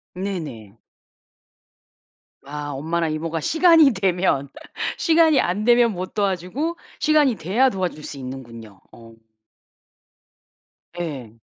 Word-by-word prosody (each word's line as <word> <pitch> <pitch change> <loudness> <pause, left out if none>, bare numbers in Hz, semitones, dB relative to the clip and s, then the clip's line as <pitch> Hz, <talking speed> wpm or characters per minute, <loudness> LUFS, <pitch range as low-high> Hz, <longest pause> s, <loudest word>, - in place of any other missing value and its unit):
네네. 155 - -6 1.7
아 145 +1 -6
엄마랑 160 +3 -2
이모가 160 +1 -3
시간이 325 - +5
되면 180 -7 0 0.5
시간이 320 -4 +4
안 185 +4 0
되면 240 0 +4
못 185 +1 -6
도와주고 205 - -2 0.2
시간이 300 -6 +3
돼야 210 +11 +2
도와줄 185 -8 -4
수 140 - -7
있는군요. 115 -6 -9
어. 115 -1 -15 1.8
네. 140 -10 -6
175 Hz, 210 characters per minute, -22 LUFS, 140-240 Hz, 1.8 s, 시간이